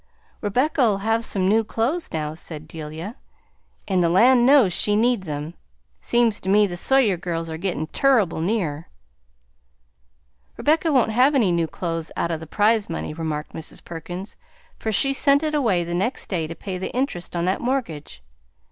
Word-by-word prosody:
"Rebecca'll 245 0 +1
have 225 +2 0
some 190 -4 0
new 220 +3 +3
clothes 240 +10 -1
now," 155 -1 -3
said 155 -1 -8
Delia, 160 +7 -7 0.7
"and 190 -3 +1
the 170 - +3
land 240 +7 +5
knows 265 -10 +5
she 205 +4 +2
needs 225 -5 +1
'em. 150 +2 -5 0.5
Seems 235 -3 +1
to 190 - -5
me 210 +2 +5
the 180 -3 -4
Sawyer 225 0 +2
girls 165 -2 -4
are 160 - -4
gittin' 175 -4 -2
turrible 215 - +2
near!" 165 -6 -2 1.7
"Rebecca 320 +2 +2
won't 255 -5 +3
have 255 +6 +3
any 220 -9 +3
new 170 -1 +1
clothes 165 -1 -4
out 170 - -1
o' 165 - -1
the 160 0 -10
prize 215 +3 +2
money," 165 - -4
remarked 155 -1 -4
Mrs. 160 - -5
Perkins, 175 +4 -7 0.4
"for 220 - -2
she 275 +6 +2
sent 280 +2 +4
it 305 -1 -1
away 225 -12 +2
the 170 0 -5
next 195 +9 -1
day 165 -5 -1
to 165 - -7
pay 185 +2 -6
the 190 - -3
interest 250 -11 -2
on 170 0 0
that 185 +1 0
mortgage." 200 - -3
195 Hz, 175 wpm, -23 LUFS, 165-240 Hz, 1.7 s, land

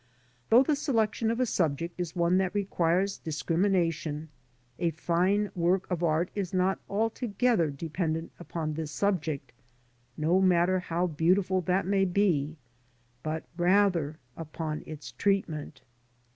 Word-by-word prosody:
Though 240 +4 +7
the 295 +2 +1
selection 225 -6 0
of 230 +1 -1
a 255 - +3
subject 170 - -1
is 175 -1 -4
one 175 +1 +3
that 190 +1 -1
requires 190 -1 +1
discrimination, 160 -1 0 0.5
a 170 -1 +2
fine 180 +6 +1
work 180 +2 +1
of 175 -2 -1
art 170 +1 +1
is 195 -2 -3
not 185 +1 +2
altogether 225 - +1
dependent 160 +2 -3
upon 165 -3 -4
the 160 0 -4
subject, 155 -6 -1 0.7
no 165 +5 +2
matter 185 0 +3
how 175 0 -1
beautiful 180 +3 +2
that 180 +2 +1
may 195 0 +2
be, 175 -6 +1 0.6
but 155 +2 -3
rather 175 -4 +2 0.2
upon 155 -1 -5
its 145 -6 -8
treatment. 160 0 -1
175 Hz, 130 wpm, -29 LUFS, 160-195 Hz, 0.7 s, Though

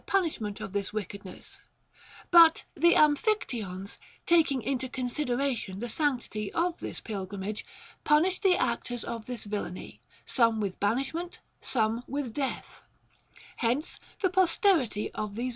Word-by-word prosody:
293 390 - +4 0.3
punishment 200 - -9
of 190 - -6
this 200 -1 -1
wickedness; 200 -2 -7 0.7
but 335 -2 +8
the 340 0 +5
Amphictyons, 250 - +1 0.3
taking 315 -7 +3
into 260 -1 -1
consideration 250 -5 -1
the 240 +4 -4
sanctity 240 -6 -1
of 345 +1 0
this - - -5
pilgrim 195 -2 -5
age, 210 +2 -3 0.4
punished 330 +5 +3
the 380 -3 +5
actors 235 0 -1
of 230 -2 -6
this 245 -3 -3
villany, 205 -3 -5 0.2
some 230 -3 +2
with 200 -3 -3
ban 205 +4 +2
ishment, 330 +6 -3 0.2
some 225 -1 0
with 275 -4 -3
death. 270 0 -4
245 Hz, 115 wpm, -29 LUFS, 210-300 Hz, 0.7 s, but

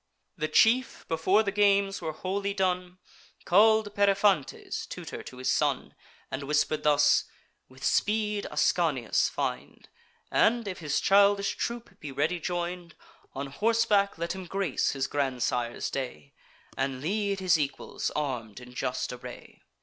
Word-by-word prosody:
The 155 - -2
chief, 245 +9 +3
before 185 +7 +2
the 200 - -1
games 200 -1 +2
were 160 -2 -3
wholly 200 +4 -3
done, 180 -2 -1 0.5
Call'd 215 +2 +4
Periphantes, 200 -6 +1
tutor - - -7
to 125 - -11
his 130 - 0
son, - - 0 0.4
And 130 - -3
whisper'd 150 +1 +1
thus: 145 -1 +4 0.4
"With 130 +1 -15
speed 210 +2 +1
Ascanius - - +1
find; - - -5 0.4
And, 235 -1 +3
if 185 - -5
his 150 -3 -1
childish 200 0 +4
troop 235 0 -5
be 145 - -7
ready 150 +6 0
join'd, 175 0 -4 0.4
On 135 +1 -3
horseback 205 +6 +1
let 170 +1 -2
him 190 -1 -8
grace 195 -5 0
his 135 -1 -1
grandsire's 125 -4 -1
day, 75 - -5 0.4
And 135 -1 -2
lead 200 +6 -1
his 180 -4 +3
equals 140 -2 -3
arm'd 125 -7 -3
in 125 0 -13
just 125 0 -2
array." 125 0 -11
180 Hz, 135 wpm, -28 LUFS, 140-200 Hz, 0.5 s, Call'd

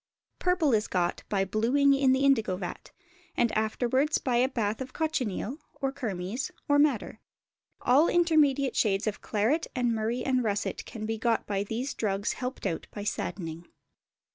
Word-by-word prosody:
Purple 360 -7 +2
is 215 -1 +2
got 175 -2 0
by 195 -2 +1
blueing 245 +8 +3
in 275 -1 +3
the 265 +1 +2
indigo 225 -9 +3
vat, 180 -2 -6 0.5
and 235 -2 +3
afterwards 245 +7 +1
by 250 -3 0
a 255 +2 +3
bath 220 -3 -2
of 260 0 -6
cochineal, 270 - -2 0.2
or 270 -1 0
kermes, 220 -3 -3 0.2
or 285 0 +4
madder; 265 -7 +1 0.6
all 280 +7 +5
intermediate 300 -6 +3
shades 200 -2 +2
of 215 -2 -3
claret 230 +10 0
and 245 -2 +1
murrey 225 +3 -1
and 255 -2 +1
russet 205 -2 -2
can 215 -2 -6
be 225 0 -3
got 230 0 +1
by 200 -1 -1
these 235 +7 -3
drugs 205 0 -1
helped 250 -3 -5
out 170 -4 -2
by 205 - -7
"saddening." 170 -5 -4
235 Hz, 165 wpm, -28 LUFS, 210-275 Hz, 0.6 s, all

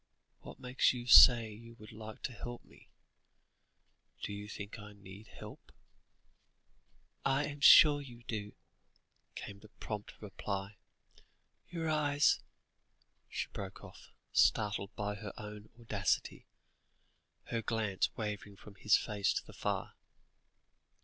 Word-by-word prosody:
What - - -11
makes 125 +1 +2
you 120 -1 -6
say 115 -2 +8
you 115 +2 -13
would 110 -2 -13
like 110 0 -10
to 130 - -3
help 120 +2 -8
me? - - -20 1.3
Do 105 - -3
you 105 +1 -7
think 105 +1 -8
I 105 0 -11
need 100 +1 -13
help?" - - -12 1.5
"I 135 +2 +1
am 145 0 -7
sure 145 -1 +8
you 120 -4 -12
do," 105 -3 -5 0.8
came 100 0 -8
the 110 - -16
prompt 105 -1 -7
reply; 100 0 -5 0.9
"your 165 -2 -4
eyes 145 -2 +2 0.4
" - - -43
she - - -3
broke - - -7
off, - - -13 0.2
startled 105 -2 +2
by 105 0 -3
her 100 -1 -8
own 105 0 -9
audacity, 105 -5 -2 1.0
her 115 - -1
glance 110 -4 -1
wavering 105 -2 -5
from 100 +1 -14
his 100 +1 +3
face 105 -2 -1
to - - -3
the - - -13
fire. - - -3
110 Hz, 130 wpm, -33 LUFS, 105-120 Hz, 1.5 s, say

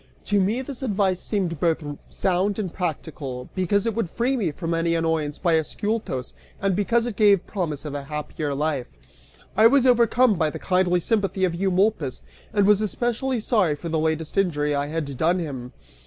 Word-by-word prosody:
(To 205 -1 +2
me, 220 +7 0
this 270 0 -7
advice 200 -6 +1
seemed 180 -7 -2
both 165 -2 +1 0.3
sound 190 +2 0
and 195 -6 -3
practical, 145 -7 -4
because 190 +2 +1
it 230 - 0
would 225 -5 -2
free 245 +8 0
me 210 -9 0
from 165 +3 -3
any 165 0 +1
annoyance 160 -3 0
by 170 -3 +2
Ascyltos, 205 - -3 0.3
and 195 -2 +1
because 230 +4 +2
it 240 -4 -4
gave 200 -3 +4
promise 160 -8 -3
of 150 - -5
a 145 - -3
happier 150 0 -4
life. 145 -3 -1 0.7
I 220 +1 +7
was 265 +1 +4
overcome 245 -1 +4
by 160 -2 +2
the - - -6
kindly 180 -1 +1
sympathy 195 -2 +1
of 175 - -1
Eumolpus, 185 - 0 0.3
and 205 -3 +3
was 210 0 +5
especially 240 +4 -1
sorry 205 -9 +2
for 170 +3 -6
the 160 0 0
latest 160 +3 -1
injury 150 -6 +1
I 145 0 0
had 150 -3 -3
done 170 +6 +2
him. 135 -8 -5
180 Hz, 185 wpm, -24 LUFS, 155-210 Hz, 0.7 s, I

